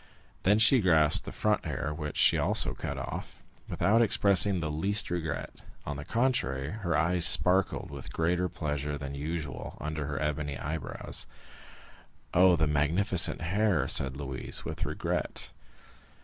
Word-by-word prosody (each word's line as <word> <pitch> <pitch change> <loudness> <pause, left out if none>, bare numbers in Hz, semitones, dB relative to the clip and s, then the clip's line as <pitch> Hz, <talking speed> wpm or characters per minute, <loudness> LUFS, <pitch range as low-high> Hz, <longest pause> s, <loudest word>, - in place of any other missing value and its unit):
Then 100 +3 +3
she 110 +3 +5
grasped 80 -5 +3
the - - -7
front - - -1
hair, 75 - -4
which 75 -1 -6
she - - +5
also - - +2
cut - - -6
off, - - -7 0.3
without 110 +4 +2
expressing 100 -3 +4
the 75 -2 -3
least 95 +8 0
regret; 80 -4 -4 0.3
on 75 - -4
the 70 - -7
contrary, 75 - -1
her 90 -7 -2
eyes 85 +2 +1
sparkled 90 -2 +4
with 70 -2 -8
greater 90 +2 -1
pleasure 75 -1 -4
than 70 0 -7
usual 75 -1 -6
under 75 -1 -4
her 70 -1 -4
ebony 75 -2 -3
eyebrows. 75 +1 -4 1.1
50039m - - +1
"Oh, 90 -1 +6
the 80 -1 +1
magnificent 80 +7 +3
hair!" 95 - 0
said 65 0 +1
Louise, 65 -3 -3
with - - -4
regret. - - -3
80 Hz, 150 wpm, -28 LUFS, 75-95 Hz, 1.1 s, Oh